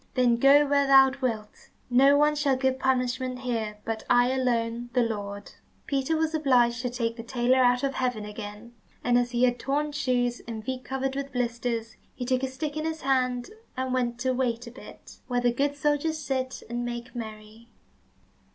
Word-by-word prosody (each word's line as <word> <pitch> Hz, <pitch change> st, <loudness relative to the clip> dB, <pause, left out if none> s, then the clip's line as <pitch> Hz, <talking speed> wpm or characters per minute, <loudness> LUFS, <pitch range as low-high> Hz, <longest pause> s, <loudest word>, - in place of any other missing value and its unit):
Then 245 Hz, -2 st, +3 dB
go 280 Hz, +4 st, +6 dB
where 280 Hz, -1 st, +2 dB
thou 270 Hz, -1 st, +7 dB
wilt. 220 Hz, -4 st, -4 dB, 0.2 s
No 270 Hz, +3 st, +5 dB
one 300 Hz, +1 st, +4 dB
shall 290 Hz, -2 st, +2 dB
give 260 Hz, 0 st, 0 dB
punishment 255 Hz, -1 st, 0 dB
here, 225 Hz, -4 st, -3 dB
but 225 Hz, -1 st, -3 dB
I 245 Hz, +1 st, +4 dB
alone, 240 Hz, -2 st, -1 dB
the 250 Hz, -2 st, +3 dB
Lord." 205 Hz, -3 st, -5 dB, 0.3 s
Peter 280 Hz, +3 st, 0 dB
was 320 Hz, 0 st, 0 dB
obliged 245 Hz, -6 st, +3 dB
to 250 Hz, -, -2 dB
take 235 Hz, -1 st, -2 dB
the 230 Hz, -, -6 dB
tailor 245 Hz, +2 st, +1 dB
out 245 Hz, 0 st, +3 dB
of 275 Hz, 0 st, 0 dB
heaven 250 Hz, -5 st, -2 dB
again, 210 Hz, +2 st, -8 dB, 0.3 s
and 245 Hz, 0 st, +2 dB
as 245 Hz, 0 st, +2 dB
he 240 Hz, 0 st, 0 dB
had 245 Hz, -1 st, +2 dB
torn 295 Hz, +3 st, -1 dB
shoes, 245 Hz, -4 st, 0 dB
and 220 Hz, -2 st, -6 dB
feet 255 Hz, 0 st, -4 dB
covered 265 Hz, +1 st, -3 dB
with 275 Hz, 0 st, -4 dB
blisters, 235 Hz, -2 st, -2 dB, 0.2 s
he 245 Hz, -, -4 dB
took 255 Hz, 0 st, +1 dB
a 265 Hz, -, 0 dB
stick 290 Hz, +3 st, -5 dB
in 310 Hz, -, -2 dB
his 320 Hz, 0 st, -3 dB
hand, 255 Hz, -1 st, 0 dB, 0.3 s
and 260 Hz, 0 st, -2 dB
went 240 Hz, -2 st, 0 dB
to 260 Hz, 0 st, +1 dB
"Wait 245 Hz, -2 st, -1 dB
a 235 Hz, -, -9 dB
bit," 245 Hz, -, -13 dB
where 245 Hz, -1 st, 0 dB
the 240 Hz, -1 st, +2 dB
good 285 Hz, +3 st, 0 dB
soldiers 295 Hz, +2 st, 0 dB
sit 260 Hz, -3 st, -3 dB
and 240 Hz, +1 st, -3 dB
make 240 Hz, 0 st, -5 dB
merry. 220 Hz, 0 st, -9 dB
250 Hz, 190 wpm, -27 LUFS, 235-270 Hz, 0.3 s, thou